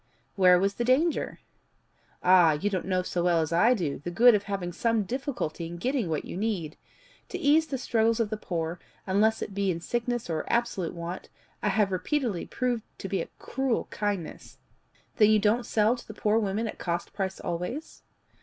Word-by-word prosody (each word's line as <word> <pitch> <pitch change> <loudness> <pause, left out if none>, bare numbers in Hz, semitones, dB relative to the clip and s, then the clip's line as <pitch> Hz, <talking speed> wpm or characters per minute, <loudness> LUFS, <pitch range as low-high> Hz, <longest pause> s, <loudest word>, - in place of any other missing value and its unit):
"Where 180 -3 +6
was 195 +2 +1
the 240 - -2
danger?" 280 +7 +1 0.8
"Ah, 180 -3 +6
you 195 +8 -1
don't 185 -2 -2
know 185 -1 +1
so 175 -1 -2
well 175 -1 +3
as 160 0 -1
I 230 +9 +5
do 160 -10 -2
the 145 - -5
good 235 +7 +6
of 210 - +2
having 195 -3 -3
some 230 +2 +1
difficulty 235 - -3
in 170 +1 -7
getting 245 0 -1
what 155 -2 -2
you - - -7
need! 190 -6 -2 0.5
To - - -4
ease 310 +3 +3
the 270 - -3
struggles 230 -2 +1
of 225 -2 0
the - - 0
poor, 170 -4 -3 0.3
unless 210 +3 +2
it 200 - -7
be 200 0 0
in 170 -2 -1
sickness 240 +5 -2
or 160 -2 -2
absolute 200 -8 0
want, 170 +2 -6 0.3
I 210 - +1
have 200 0 +2
repeatedly 225 - -1
proved 250 -3 -1 0.2
to - - -6
be - - 0
a - - -6
cruel 265 -3 -1
kindness." 205 -6 -4 0.6
"Then 210 -2 +6
you 215 - +6
don't 215 +4 +1
sell 220 +2 +3
to - - -12
the 215 - -9
poor 215 +1 +2
women 210 +2 -1
at - - -7
cost 170 -1 -3
price 190 -2 -3
always?" 180 - -5
205 Hz, 195 wpm, -27 LUFS, 175-235 Hz, 0.8 s, Where